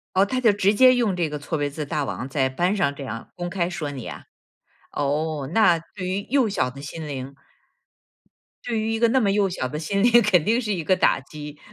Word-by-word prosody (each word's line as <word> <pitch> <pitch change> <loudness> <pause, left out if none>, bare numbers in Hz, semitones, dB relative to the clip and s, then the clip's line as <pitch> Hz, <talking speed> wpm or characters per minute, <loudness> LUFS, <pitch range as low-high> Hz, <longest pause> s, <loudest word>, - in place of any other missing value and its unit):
哦， 195 - +5
他 255 +5 -2
就 230 -4 +5
直 200 0 +2
接 255 +4 +6
用 225 -7 +1
这 170 -3 -1
个 150 - -4
错 145 +3 -4
别 145 -1 -1
字 150 +1 -5
大 150 0 -2
王 130 - -4
在 135 -1 0
班 175 +9 0
上 175 -8 +1
这 140 - -7
样 115 -3 -7
公 175 0 -4
开 175 -2 -1
说 165 -5 -4
你 130 -5 -7
啊？ - - -8 0.7
哦， 145 0 -1
那 195 -7 +5 0.2
对 185 -3 -5
于 190 +2 -2
幼 265 -4 +3
小 195 -10 0
的 135 +2 -11
心 155 +2 -7
灵 135 -1 -6 1.3
对 230 -2 -2
于 220 +1 -1
一 225 - -1
个 235 +1 +4
那 260 +3 +3
么 205 -4 +2
幼 200 0 +2
小 130 -8 -3
的 150 - -5
心 200 +5 -1
理， 240 - +5
肯 190 -5 +3
定 230 +3 +2
是 220 -4 -2
一 180 -4 -2
个 185 +4 +2
打 - - +3
击。 150 +1 -10
175 Hz, 255 characters per minute, -23 LUFS, 145-205 Hz, 1.3 s, 接